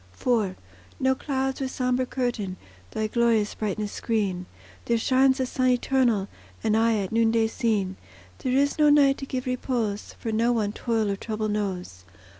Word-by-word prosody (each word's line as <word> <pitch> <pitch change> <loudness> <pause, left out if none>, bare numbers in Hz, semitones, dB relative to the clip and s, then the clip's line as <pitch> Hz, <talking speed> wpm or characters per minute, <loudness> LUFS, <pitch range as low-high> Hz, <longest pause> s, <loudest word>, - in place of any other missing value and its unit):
IV 220 -7 +1 0.4
No 265 0 +3
clouds 265 0 -2
with 265 - -1
sombre 255 0 0
curtain 240 -8 -2 0.3
Thy 215 - -2
glorious 225 -1 +2
brightness 210 0 -3
screen; 195 -6 -1 0.4
There 235 - +2
shines 260 +3 +3
the 260 - 0
Sun 255 0 0
Eternal, 245 -5 +2 0.4
And 220 -1 +2
aye 225 0 +3
at 195 -2 -3
noonday 225 0 +3
seen; 215 -5 -1 0.4
There 255 - -1
is 285 +3 +2
no 300 -1 +6
night 280 -2 +5
to 275 - -6
give 255 0 -3
repose, 245 -5 -2
For 225 - -4
no 230 +2 +2
one 215 -3 0
toil 220 -2 -1
or - - -1
trouble 215 +1 -3
knows. 185 - -3
230 Hz, 165 wpm, -26 LUFS, 210-255 Hz, 0.4 s, no